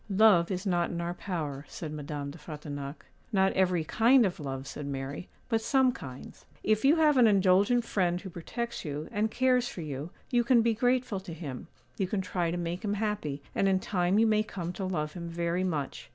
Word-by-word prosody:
'Love 195 -4 +5
is 185 +1 -3
not 175 -3 +1
in 170 - -4
our 170 0 -2
power,' 155 -7 -4
said 155 -3 -6
Madame 145 -1 -5
de 155 - -11
Frontignac. 145 -2 -7 0.3
'Not 190 -2 +3
every 185 -3 +2
kind 235 - +5
of 190 -1 -2
love,' 135 -2 -5
said 140 +1 -6
Mary, 140 +4 -5 0.2
'but 225 -2 +1
some 265 +1 +3
kinds. 130 - -10 0.2
If 215 0 +2
you 280 +4 +6
have 305 -3 +4
an 245 -2 +7
indulgent 200 +4 +4
friend 180 -5 +1
who 190 0 -8
protects 235 +8 -5
you, 150 0 -4
and 215 +2 0
cares 250 +1 +2
for 180 - -6
you, 145 0 -5 0.2
you 240 -1 +3
can 235 -1 +4
be 230 0 +3
grateful 245 -2 +1
to 185 -4 -8
him; 140 -6 -7 0.3
you 190 - +1
can 195 +1 -1
try 175 -2 -1
to 175 - -2
make 175 +3 -3
him 205 -1 0
happy, 195 -10 -2
and 195 - +2
in 190 -1 +3
time 180 0 +1
you 225 - +5
may 215 -1 +3
come 180 -5 -5
to 190 - -4
love 150 -5 -2
him 170 -1 -6
very 170 +2 -1
much. 155 -7 -3
185 Hz, 210 wpm, -29 LUFS, 155-215 Hz, 0.3 s, an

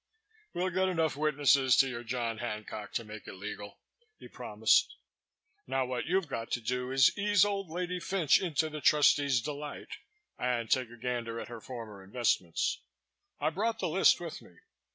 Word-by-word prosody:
"We'll 185 +1 0
get 185 +2 +1
enough 160 -5 0
witnesses 140 -3 +3
to 135 - +5
your 120 -2 -5
John 115 -1 -3
Hancock 105 -2 -5
to 115 - -1
make 110 -1 -10
it - - -7
legal," 100 +1 -7 0.4
he - - -12
promised. - - +2 0.7
"Now 135 -1 0
what 125 +1 -3
you've 185 0 +1
got 115 -5 -5
to - - +1
do 125 +2 -2
is 135 -2 +5
to 205 - -6
ease 205 -1 +4
old 200 -3 -2
lady 180 +2 -3
Fynch 175 -3 +2
into 160 -4 0
the 155 -1 -6
trustee's 140 -4 +4
delight 145 +1 -6 0.5
and 120 -3 -1
take 130 -3 +2
a 120 - -13
gander 120 -1 -3
at - - -7
her 120 -2 -8
former 115 -6 -8
investments. 95 -5 0 0.6
I've 160 - 0
brought 225 +5 0
the - - -2
list - - +5
with - - -7
me. - - -18
130 Hz, 175 wpm, -31 LUFS, 115-160 Hz, 0.7 s, to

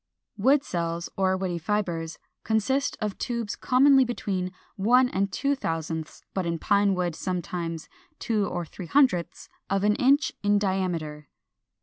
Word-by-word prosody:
410. 200 - -7
=Wood 275 +3 +5
Cells, 170 -1 -3
or 190 -1 +1
Woody 180 -2 -2
Fibres=, 170 -3 -2 0.3
consist 245 +6 0
of 210 -2 -3
tubes, 235 -4 -3
commonly 270 +1 +5
between 195 -7 -3 0.2
one 245 +5 +4
and 195 -1 -1
two 280 +6 0
thousandths, 160 - -4
but 190 - -1
in 170 -1 -1
Pine 200 +2 +2
wood 180 -2 -1
sometimes 170 -2 -4 0.3
two 215 -3 0
or 175 -1 -3
three 175 +2 -9
hundredths, 250 - +2 0.2
of 195 0 +1
an 210 0 +4
inch 280 +4 +3
in 205 0 +3
diameter. 175 -7 -2
195 Hz, 145 wpm, -26 LUFS, 170-225 Hz, 0.3 s, =Wood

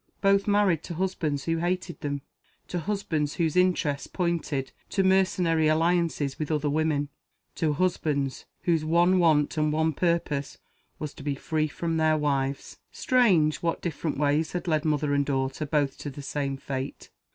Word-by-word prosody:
Both 195 0 +3
married 200 -6 +3
to 170 - -6
husbands 160 -6 -1
who 165 0 0
hated 175 +1 -2
them; 145 -2 -3 0.5
to 180 - -2
husbands 165 -6 -2
whose 160 -3 0
interests 175 -6 +1
pointed 170 -6 -2 0.2
to 195 - +1
mercenary 185 -4 +3
alliances 165 -3 +1
with 155 - -3
other 150 -1 0
women; 150 -2 0 0.4
to 155 -2 0
husbands 145 -5 -1 0.2
whose 170 -4 +2
one 175 +4 +3
want 155 -3 +3
and 150 0 +2
one 160 +1 +1
purpose 150 -4 -1 0.4
was 150 -1 -5
to - - -12
be 140 0 -2
free 155 +2 -1
from 165 +2 -2
their 155 -1 +3
wives. 140 -2 -2
Strange, 185 -12 +3
what 165 -1 -1
different 160 -2 -3
ways 150 +2 +1
had 180 0 -3
led 155 -1 +1
mother 150 -1 +1
and 140 0 +1
daughter 135 +2 -1
both 145 -2 0
to 145 - -5
the 140 +1 -9
same 140 -1 -2
fate! 135 0 -6
155 Hz, 165 wpm, -27 LUFS, 145-175 Hz, 0.5 s, Both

